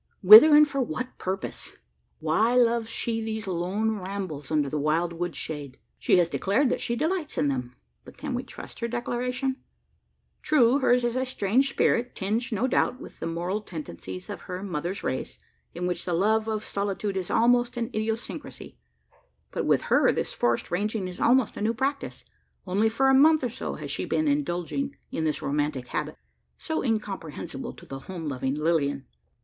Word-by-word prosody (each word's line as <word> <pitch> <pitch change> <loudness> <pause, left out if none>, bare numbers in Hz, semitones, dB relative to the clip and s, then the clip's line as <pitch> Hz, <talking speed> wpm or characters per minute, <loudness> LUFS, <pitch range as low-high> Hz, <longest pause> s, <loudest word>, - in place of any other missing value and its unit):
Whither, 220 +11 +11
and 300 0 +7
for 275 -1 -1
what 255 +1 -4
purpose? 190 +1 -5 0.4
Why 230 +3 +2
loves 235 -2 +3
she 230 0 -2
these 220 -1 -4
lone 195 +4 -1
rambles 185 -7 -5
under 150 -2 +1
the 150 +2 -2
wild 165 +4 +1
wood 175 0 -4
shade? 145 -4 -6 0.2
She - - +3
has 175 -2 +4
declared 205 +10 +1
that - - -1
she 235 - -1
delights 315 +4 -2
in 145 - +2
them; 125 -2 -3 0.3
but - - -14
can - - -4
we - - -1
trust - - -11
her 235 - -1
declaration? 250 +2 -2 0.8
True, 265 -3 +4
hers 250 -2 +3
a 245 +2 0
strange 255 +1 +1
spirit 245 -2 +1
tinged, 225 +6 -2
no 220 +3 0
doubt, 255 0 +1
with - - -12
the - - -3
moral 175 +5 -2
tendencies 95 - -8
of - - -7
her 185 0 -6
mother's 180 0 -4
race 130 - -3 0.4
in 175 +1 -3
which 180 0 -2
the 180 - -2
love 215 +4 +2
of 215 -1 -2
solitude 200 0 -2
is 185 -2 -3
almost 240 +1 +3
an 235 +1 -2
idiosyncrasy. 220 - -5 0.7
But - - -2
with - - +3
her - - +4
this - - -2
forest 120 -1 0
ranging 205 +2 -1
is 180 - -8
almost 250 -1 +3
a - - -5
new 225 +2 +1
practice: 275 +4 -3 0.4
only 200 +4 +2
for 265 +5 +2
a - - +4
month 310 +2 +6
or 250 - 0
so 230 - -5
has - - -6
she - - -2
been 315 - 0
indulging 275 - -1 0.2
in 160 - -2
this 155 - -1
romantic 145 -3 -1
habit 150 0 -3 0.4
so 320 - -2
incomprehensible 195 - -4
to - - -15
the 135 - -7
home 170 +2 -7
loving 135 -1 -2
Lilian. 145 -3 0
210 Hz, 180 wpm, -26 LUFS, 170-245 Hz, 0.8 s, Whither